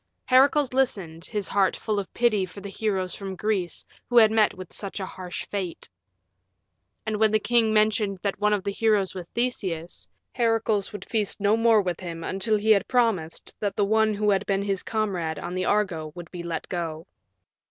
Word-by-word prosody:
Heracles 270 +1 +4
listened, 190 -11 -1
his 205 -2 -3
heart 195 -2 +2
full 215 -2 -1
of 195 - -6
pity 230 -5 +2
for 185 +2 -7
the 200 0 -7
heroes 195 -3 -2
from 195 -1 -6
Greece 195 -3 -2 0.2
who 245 - +2
had 220 -2 +8
met 220 -1 +3
with 185 -2 -10
such 200 -1 -4
a 190 - -3
harsh 185 -1 -7
fate. 190 -4 -5 1.2
And 215 -1 -1
when 220 +1 +4
the 215 - +3
king 225 0 +2
mentioned 215 -2 +2
that 200 -2 -1
one 210 0 +2
of 205 -2 +1
the 200 - -1
heroes 210 -2 +1
was 180 -2 -8
Theseus, 190 -9 -2 0.2
Heracles 225 -4 +1
would 205 -2 -7
feast 215 -3 0
no 205 +1 +3
more 225 -2 +4
with 180 -3 -2
him 170 -3 -6
until 195 +5 0
he 215 +2 +2
had 200 -3 +4
promised 225 -10 0
that 200 -2 -2
the 205 - +2
one 220 +1 +2
who 210 0 +2
had 195 - +2
been 195 0 +1
his 195 -2 -1
comrade 185 -8 -2
on 175 - -5
the 185 0 -1
Argo 180 -7 0
would 175 -1 -9
be 175 - -6
let 170 -1 -4
go. 165 -2 -4
200 Hz, 195 wpm, -25 LUFS, 185-220 Hz, 1.2 s, had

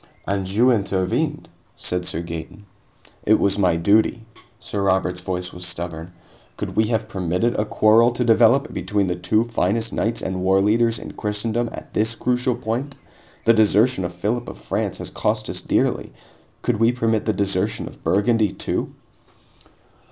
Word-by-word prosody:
"And 95 -1 -2
you 120 +6 +4
intervened," 95 -4 -1 0.3
said 90 0 -2
Sir 80 - -3
Gaeton. 85 +5 -8 0.6
"It 110 - +5
was 100 0 +1
my 90 -4 +3
duty." 110 +6 +2 0.3
Sir 105 -3 -3
Robert's 95 -2 +1
voice 90 0 -4
was 90 - -7
stubborn. 85 -1 -5 0.5
"Could - - -5
we 110 - +3
have 110 -1 -1
permitted 95 +2 0
a 105 - 0
quarrel 110 +3 +4
to 125 - -1
develop 120 +5 +4
between 100 +2 0
the 90 -1 -1
two 90 +5 +1
finest 115 -1 -1
knights 115 +2 -1
and 95 0 -3
warleaders 105 +5 +3
in - - -8
Christendom 110 +3 -2
at - - -10
this 110 +2 +1
crucial 125 +1 0
point? 125 +4 -3 0.5
The 115 - +6
desertion 110 0 +3
of 90 - -3
Philip 105 +7 -2
of - - -9
France - - -3
has - - -7
cost - - -1
us - - -5
dearly. - - 0 0.5
Could 120 -3 +1
we 115 +1 +4
permit 115 -3 0
the 110 - +2
desertion 100 -1 -1
of - - -13
Burgundy, 105 +1 +2
too?" - - -3
105 Hz, 160 wpm, -22 LUFS, 95-115 Hz, 0.6 s, The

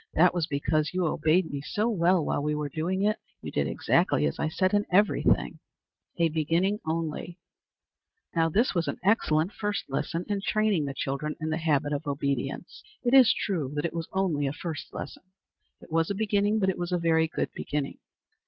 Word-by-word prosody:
That 180 +3 +5
was 170 -3 -1
because 155 +2 0
you 185 -1 +1
obeyed 160 +2 +2
me 140 -1 -4
so 210 +9 -1
well 180 -6 +2
while - - 0
we 150 +1 0
were 150 -1 -3
doing 175 +7 -1
it. 210 +1 +1 0.2
You - - -5
did - - 0
exactly 75 - +2
as 70 - -2
I 155 - 0
said 185 +4 0
in 205 0 +3
every 205 +3 +4
thing." - - +1 0.6
A 170 -1 +3
Beginning 165 +6 +1
only. 165 +1 -3 1.0
Now 165 -1 +3
this 225 +10 +2
was 170 -3 0
an - - -2
excellent 180 -4 +2
first 205 -1 -3
lesson 165 +5 -2
in 205 -1 -1
training 210 -6 +1
the 135 -1 -4
children 140 +4 -3
to 155 - -3
the 160 0 0
habit 150 -3 +1
of 145 +1 -3
obedience. 140 -1 -3 0.2
It 245 0 +1
is 260 -4 +8
true 160 -10 -2
that 150 - -1
it 170 - -2
was 165 -1 -4
only 170 -7 0
a 135 - -2
first 160 -1 -6
lesson. - - -7 0.6
It - - -16
was 165 0 +1
a 200 - -1
beginning, 205 0 +1
but 190 -3 +2
it 185 - -2
was 175 0 -3
a 180 - +2
very 165 -1 +2
good - - -3
beginning. 145 -1 -3
165 Hz, 200 wpm, -27 LUFS, 150-190 Hz, 1.0 s, is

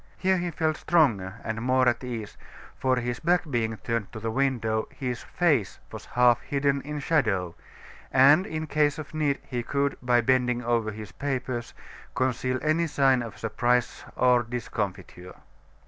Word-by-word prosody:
Here 190 0 +2
he 175 0 -2
felt 155 -1 -1
stronger 110 - +2
and 110 0 -3
more 130 +1 +2
at 120 +1 +1
ease 115 -4 -5 0.4
for 130 -1 +1
his 120 0 -3
back 175 +2 +2
being 110 -3 -1
turned 115 -2 -3
to 110 - -6
the 115 +1 -3
window, 115 -4 0
his 125 -4 -4
face 145 - 0
was - - -8
half 120 -1 +3
hidden 140 +1 0
in 150 +2 -6
shadow; 105 - 0 0.6
and 145 +9 +6
in 155 -5 -4
case 150 -1 +1
of 150 -2 -8
need, 150 -3 0
he 125 -2 -3
could, 140 +3 -1
by 125 -1 +3
bending 125 0 +1
over 115 -2 0
his 105 -3 -8
papers, 130 -3 -4 0.4
conceal 130 0 0
any 160 +2 +2
sign 135 -4 +3
of 110 -4 -7
surprise 120 +3 0
or 125 -1 +4
discomfiture. 100 -6 -5
125 Hz, 160 wpm, -26 LUFS, 115-140 Hz, 0.6 s, and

